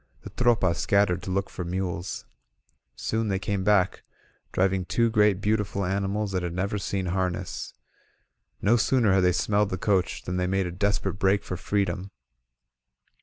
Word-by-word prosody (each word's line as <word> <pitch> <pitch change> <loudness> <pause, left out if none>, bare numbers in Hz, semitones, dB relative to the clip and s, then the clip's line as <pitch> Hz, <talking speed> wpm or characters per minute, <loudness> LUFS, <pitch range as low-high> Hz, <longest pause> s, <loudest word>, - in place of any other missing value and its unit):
The - - -9
Tropa 115 -8 +2
scattered 95 -1 +2
to 95 - -6
look 95 +2 0
for 90 - -6
mules. 90 0 -3 0.7
Soon 110 0 -1
they 95 -2 0
came 95 0 -2
back, 100 -2 +2 0.5
driving 95 0 +1
two 115 +5 +1
great 105 -3 +3
beautiful 105 -2 0
animals 100 +2 -1
that 95 -1 -1
had 85 -1 -4
never 100 +3 -1
seen 95 -1 -2
harness. 90 -1 -3 0.9
No 115 +4 +4
sooner 115 -3 +3
had 95 -1 +3
they 90 - +5
smelled 105 +3 +1
the 95 - -2
coach 95 -2 0
than 90 0 -3
they 90 0 0
made 95 0 +1
a 90 - -3
desperate 100 +1 -1
break 95 0 +2
for 90 - -4
freedom. 95 0 -1
95 Hz, 165 wpm, -26 LUFS, 90-105 Hz, 0.9 s, they